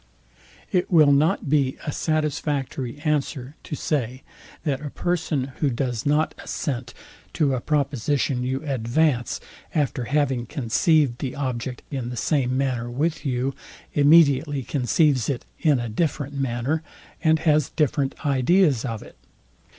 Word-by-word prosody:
It 180 -3 +1
will 155 -4 +6
not 145 +2 +2
be 140 -2 +2
a 145 - -1
satisfactory 145 -4 -2
answer 145 -3 -1
to - - -5
say, 130 -4 -2 0.4
that 140 -3 -1
a 145 - -4
person, 155 -6 -1
who 145 - +2
does 120 -1 -2
not 150 +2 +2
assent 125 -4 -4 0.4
to 145 -4 +2
a 125 - -1
proposition 140 -2 0
you 130 +3 -2
advance; 130 0 +1 0.4
after 135 -5 0
having 135 -3 0
conceived 140 0 +2
the 130 -3 -4
object 130 -2 -3
in 130 -4 -3
the 125 - -6
same 130 +1 +1
manner 125 -3 -1
with 150 +5 -1
you; 130 +1 0 0.4
immediately 145 -2 +5
conceives 135 0 +2
it 135 -4 -2
in 150 -4 +3
a 120 - -3
different 145 +3 -1
manner, 135 +3 -1 0.4
and 160 -1 +5
has 155 -3 +2
different 145 -2 -1
ideas 140 0 +3
of 115 -5 -4
it. - - -15
140 Hz, 135 wpm, -24 LUFS, 125-150 Hz, 0.4 s, will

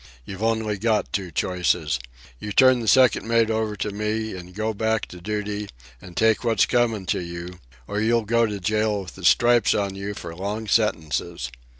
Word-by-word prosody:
You've 95 0 -8
only 110 -2 0
got 110 0 0
two 95 -3 -2
choices. 85 -6 0 0.4
You'll 105 - -5
turn 130 +1 +6
the 115 - -5
second 130 0 +4
mate 115 -1 +3
over 110 -1 -1
to 105 - -3
me 105 +1 -2
an' 90 0 -9
go 110 +2 -2
back 110 +1 0
to 90 - -11
duty 105 +1 -3 0.3
and 90 -2 -12
take 110 +1 +3
what's 115 -2 +3
comin' 115 -5 +1
to - - 0
you, 85 +1 -7 0.3
or 105 - -2
you'll 115 0 +2
go 115 +1 +2
to 105 -1 -4
jail 105 +1 0
with 90 - -11
the 95 - -12
stripes 120 +6 +4
on 100 -2 -1
you 100 +1 -5
for 85 -3 -7
long 105 +4 -4
sentences. 85 - 0
105 Hz, 190 wpm, -23 LUFS, 95-110 Hz, 0.4 s, turn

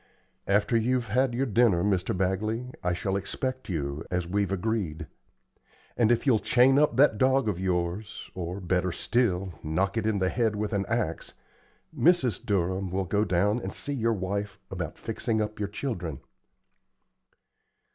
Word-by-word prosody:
After 105 +4 +2
you're 125 +3 +2
had 120 +3 0
your 135 +3 +1
dinner, 110 -7 +3
Mr. 95 -2 0
Bagley, 110 +6 -1
I 90 - +1
shall 95 +2 -1
expect 130 +6 -3
you, 75 -3 -3
as 90 -1 -1
we've 100 +1 0
agreed. 95 -6 -2 0.9
And 120 -1 +3
if 120 - +1
you'll 120 -6 +4
chain 130 +5 +4
up 150 -5 +3
that 130 -6 +5
dog 130 -1 +3
of 95 -4 -1
yours, 95 +3 -2
or, 90 +1 -4
better 90 0 0
still, 95 -3 0
knock 95 +7 -1
it 110 -1 0
on 110 -2 +1
the 95 -1 +1
head 115 -1 0
with 105 +1 -2
an 100 -1 0
axe, 110 -8 -2 0.6
Mrs. 160 -9 +3
Durham 95 -1 0
will 95 +1 -1
go 100 +4 +1
down 100 +4 +1
and - - -5
see 145 - -3
your 115 -3 +1
wife 100 +1 -3
about - - -4
fixing 110 -1 -2
up 105 0 -3
your 100 -1 -2
children." 90 - -4
105 Hz, 160 wpm, -27 LUFS, 90-115 Hz, 0.9 s, that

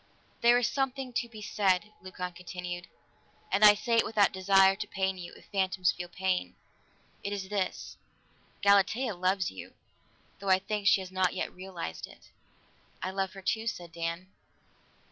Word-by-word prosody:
"There 240 +1 +6
is 245 - +2
something 270 -2 -2
to 235 0 -1
be 215 -2 -10
said," 205 0 +1
Leucon 180 -1 -6
continued, 175 0 -6 0.6
"and 200 +2 +2
I 210 -1 +10
say 230 +2 0
it - - +5
without 210 -2 +3
desire 195 0 +5
to 210 0 -4
pain 190 -1 -1
you, 175 -1 -7
if - - -16
phantoms 190 -2 +2
feel 175 0 -7
pain. 180 - -1 0.7
It 200 - -3
is 195 -2 -4
this: 195 -3 -3 0.7
Galatea 205 +4 +4
loves 185 +1 0
you, 95 - -10 0.6
though 195 0 -4
I 190 - +7
think 205 +1 -3
she 195 - +5
has 185 0 -8
not 185 -1 +1
yet - - -3
realized 180 - -6
it." - - -18 0.7
"I 185 - -2
love 190 0 -2
her 195 -1 -10
too," 220 +3 -1
said 175 -6 -4
Dan. 170 +2 -4
190 Hz, 165 wpm, -30 LUFS, 180-210 Hz, 0.7 s, I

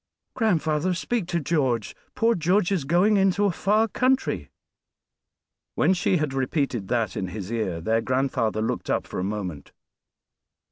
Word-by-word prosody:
"Grandfather, 180 - +1
speak 210 +1 -2
to 170 -1 0
George; 135 -8 0 0.2
poor 235 -2 +3
George 180 +2 +1
is 180 -8 0
going 180 +8 +3
into 195 +1 +3
a 200 - +3
far 210 +6 +2
country." 260 +4 0 1.3
When 185 - +3
she 185 0 +1
had 150 -4 -1
repeated 130 - -1
this 115 -6 -1
in 95 - -2
his 95 +2 -6
ear 105 -8 -2
their 110 +7 +1
grandfather 125 -4 0
looked - - -3
up - - 0
for - - -5
a - - -1
moment. 95 -6 -5
150 Hz, 150 wpm, -25 LUFS, -, 1.3 s, poor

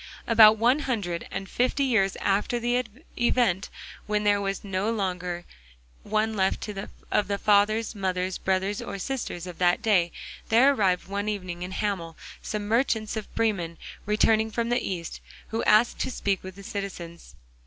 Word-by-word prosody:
About 220 -1 +7
one 245 +6 +3
hundred 205 - -2
and 195 - -5
fifty 255 +6 +1
years 220 -8 +2
after 205 +5 +1
the 240 +1 +1 0.4
event, 235 -6 +2 0.4
when 210 0 0
there 205 -1 +3
was 195 -1 -3
no 195 +1 -1
longer 180 -5 -2 0.6
one 215 +1 0
left 190 +1 0 0.4
of 205 - +2
the 200 0 -1
fathers, 210 +2 +2
mothers, 185 -2 -2
brothers 190 +2 0
or - - -5
sisters 215 -6 -4
of 180 -2 -9
that 175 -1 +2
day, 180 -6 +3 0.4
there 255 +5 +6
arrived 185 -8 +1
one 200 +2 -2
evening 185 -4 -4
in 180 - -4
Hamel 190 -5 -3 0.2
some 210 -1 -4
merchants 225 -1 +1
of 215 -2 -6
Bremen 190 -7 0 0.3
returning 220 +1 +3
from 230 +1 -2
the 240 +1 +1
East, 170 -3 -5 0.3
who 225 - -2
asked 215 +3 +4
to - - -1
speak 200 -6 -1
with 185 0 -9
the 200 - -11
citizens. 180 -4 -7
205 Hz, 160 wpm, -26 LUFS, 185-225 Hz, 0.6 s, About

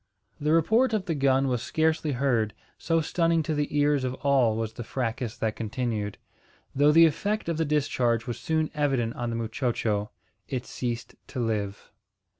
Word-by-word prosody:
The 150 +1 0
report 220 - +3
of 210 -4 0
the 170 - -1
gun 135 -2 +2
was 125 -3 0
scarcely 160 0 0
heard, 120 -5 +1 0.2
so 165 -1 +1
stunning 165 +1 +1
to 155 - -2
the 150 0 -1
ears 145 -1 +3
of 130 0 -2
all 130 -6 +4
was 110 -1 -3
the 120 - -6
fracas 115 0 -3
that 110 -1 -1
continued; 110 -2 -3 0.6
though 145 +2 +5
the 165 +2 +8
effect 205 +7 0
of 170 -2 -1
the 160 - +1
discharge 125 -6 +1
was 120 -2 -4
soon 160 -1 0
evident 135 -7 0
on 120 -1 -3
the 115 - -3
muchocho. 115 -3 -1 0.4
It 130 -2 -3
ceased 120 -2 -4
to - - -6
live. 105 -4 -2
135 Hz, 175 wpm, -27 LUFS, 115-155 Hz, 0.6 s, the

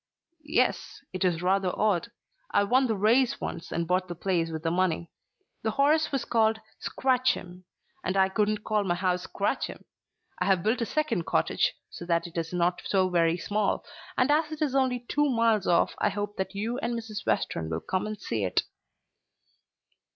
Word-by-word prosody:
"Yes, - - 0
it 185 - -2
is 175 -2 +1
rather 190 0 +2
odd. 210 0 +1 0.4
I 205 - +3
won 255 +6 +3
the 220 - 0
race 230 +6 +3
once 165 - -5
and 170 0 -1
bought 185 +1 +1
the 175 - -5
place 170 -2 0
with 160 -1 -5
the 165 - +1
money. 170 -2 0 0.5
The 220 - 0
horse 305 +3 +3
was 275 -2 -1
called 220 -1 +2 0.2
Scratch'em, 245 -9 0 0.4
and 190 - -1
I 190 0 +5
couldn't 210 +1 0
call 215 -1 +1
my 175 -3 0
house 180 0 -1
Scratch'em. - - -2 0.5
I 180 - +1
have 190 -3 +2
built 225 +4 +1
a 230 - 0
second 305 - -1
cottage, - - +1 0.2
so 175 - -8
that 170 0 +1
it 170 - -10
is 165 -1 -2
not 175 0 +1
so 190 -2 +2
very 170 -1 +2
small, 205 +3 -1 0.3
and 255 +3 +3
as 310 +1 +2
it 310 0 -2
is 280 -4 0
only 255 -3 +1
two 295 0 +2
miles 230 -4 +2
off 175 - +3
I - - +3
hope 205 +1 -4
that 190 +1 -3
you 230 +5 -2
and 235 -2 -2
Mrs. 220 -2 -6
Western 80 -1 0
will 80 0 -2
come 185 +2 -2
and 215 -1 -5
see 110 -3 -2
it." 95 - +1
200 Hz, 190 wpm, -28 LUFS, 175-235 Hz, 0.5 s, I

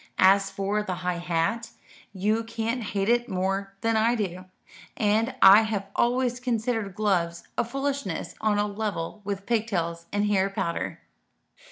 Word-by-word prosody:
As 195 +1 +5
for 195 +2 -1
the 190 -3 -3
high 180 -1 0
hat, 175 +7 -1 0.4
you 210 +3 0
can't 230 +2 -2
hate 200 -2 -2
it 240 +1 +2
more 195 +1 -2
than 225 -1 +1
I 225 +2 +3
do; 185 -4 -3 0.5
and 220 +4 +1
I 195 +3 +10
have 205 -3 -3
always 245 0 +1
considered 225 -5 -1
gloves 175 -5 0
a - - +2
foolishness 270 - -3
on 215 -1 +2
a 205 - +2
level 210 -2 -4
with 200 -1 -4
pigtails 175 -8 -1
and 205 +1 +1
hair 195 -2 +2
powder." 170 -3 -3
205 Hz, 150 wpm, -26 LUFS, 190-225 Hz, 0.5 s, I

